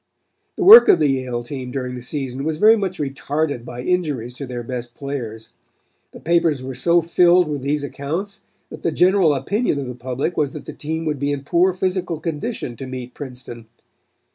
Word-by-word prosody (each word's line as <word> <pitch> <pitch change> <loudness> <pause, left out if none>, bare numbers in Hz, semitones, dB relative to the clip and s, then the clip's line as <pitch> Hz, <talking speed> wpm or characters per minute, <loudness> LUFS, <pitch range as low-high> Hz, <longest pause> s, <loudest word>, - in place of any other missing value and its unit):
"The - - -2
work 445 +5 +10
of - - +6
the 150 -3 +2
Yale 130 -3 -2
team 130 0 -6
during 125 -1 -4
the 125 - -7
season 135 0 -4
was 155 0 -2
very 215 +5 +6
much 195 -4 -3
retarded 145 -1 -2
by 120 +1 -8
injuries 145 -10 -1
to 135 +2 -7
their 120 -1 -5
best 120 0 -6
players. 120 -6 -6 0.6
The - - -13
papers 165 -5 +1
were 130 0 -5
so 170 +6 +2
filled 175 +1 +4
with 145 -3 -3
these 145 +2 -1
accounts 175 +9 -5 0.3
that - - -9
the 170 - 0
general 180 -2 +3
opinion 200 - -1
of 140 - -3
the 125 - -5
public 130 +7 -3
was 145 -3 0
that - - -8
the - - -7
team 160 +2 -4
would 150 -3 -2
be 140 +1 -1
in 140 -1 -3
poor 175 +6 +3
physical 185 -2 -2
condition 160 - -4
to 135 - -7
meet 125 -1 -7
Princeton. 125 -4 -9
145 Hz, 195 wpm, -21 LUFS, 130-170 Hz, 0.6 s, work